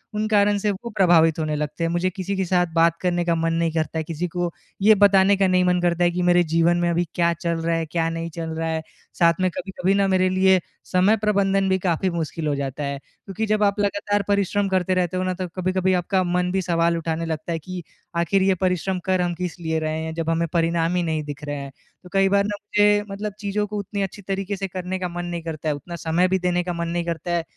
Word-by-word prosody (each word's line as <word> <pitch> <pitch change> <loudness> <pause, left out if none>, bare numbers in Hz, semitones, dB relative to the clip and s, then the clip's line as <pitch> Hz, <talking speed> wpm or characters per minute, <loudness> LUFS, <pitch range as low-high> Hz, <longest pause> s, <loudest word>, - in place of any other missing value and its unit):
उन 215 +1 0
कारण 205 -1 +3
से 205 +1 0
वो 205 +5 -6
प्रभावित 165 -4 +4
होने 155 -1 -1
लगते 150 +2 -3
हैं। 165 - +1
मुझे 175 +2 +1
किसी 190 +2 -4
के 190 - 0
साथ 180 0 +2
बात 165 0 +3
करने 175 -1 0
का 170 -1 +2
मन 165 0 0
नहीं 165 0 +1
करता 160 0 -2
है, 160 - -1
किसी 165 +2 -3
को 175 0 -2 0.3
ये 215 +2 +7
बताने 200 -1 +5
का 195 - +3
नहीं 185 0 +3
मन 180 0 +2
करता 175 0 +1
है 175 - +3
कि, 180 - -2
मेरे 175 0 +4
जीवन 165 +2 +2
में 175 0 +1
अभी 170 +1 +1
क्या 170 -1 +2
चल 170 0 -2
रहा 165 0 0
है, 165 -1 -1
क्या 165 +1 -1
नहीं 165 0 -4
चल 165 -1 -4
रहा 165 - -1
है। 160 0 -1 0.4
साथ 170 -1 +5
में 185 - +3
कभी-कभी 190 0 -1
ना 200 0 +2
मेरे 185 -1 +2
लिए 190 0 +4 0.3
समय 190 +4 +3
प्रबंधन 195 -2 +1
भी 190 - +3
काफ़ी 180 +1 0
मुश्किल 165 -2 -3
हो 145 - +1
जाता 140 +1 -4
है। 140 0 -3
क्योंकि 195 +8 -6
जब 215 0 +1
आप 205 0 +2
लगातार 205 0 0
परिश्रम 200 0 +1
करते 185 -1 +1
रहते 185 0 0
हो 185 - 0
ना 185 - -1
तो 185 0 -4
कभी-कभी 185 0 +1
आपका 185 +1 +1
मन 180 0 0
भी 190 0 0
सवाल 170 -1 +1
उठाने 165 0 -2
लगता 160 +1 -4
है 165 - -1
कि, 180 +2 -7 0.3
आख़िर 170 +3 +2
ये 190 -1 +3
परिश्रम 185 0 -1
कर 185 -1 +2
हम 175 -1 0
किस 180 0 -5
लिए 160 -1 -1
रहे 155 0 -2
हैं, 160 0 -4
जब 165 0 -3
हमें 165 +1 +1
परिणाम 165 0 +1
ही 180 - +1
नहीं 160 -2 -1
दिख 145 0 -8
रहा 145 0 -3
हैं। 140 -1 -6 0.3
तो 180 - -13
कई 195 0 +4
बार 200 0 +3
ना 205 0 -2
मुझे 210 0 +1 0.3
मतलब 205 +1 -4
चीज़ों 210 0 -1
को 210 - -5
उतनी 200 +1 -4
अच्छी 195 +1 -4
तरीके 195 +1 -3
से 195 0 -3
करने 185 0 -4
का 180 - -2
मन 175 0 -5
नहीं 175 -1 -4
करता 160 -1 -4
है, 150 - 0
उतना 170 +5 -8
समय 165 +2 +1
भी 190 +1 +1
देने 180 0 0
का 180 0 -3
मन 170 0 -3
नहीं 170 0 -2
करता 170 0 -3
है, 170 -1 +1
175 Hz, 260 wpm, -23 LUFS, 165-190 Hz, 0.4 s, ये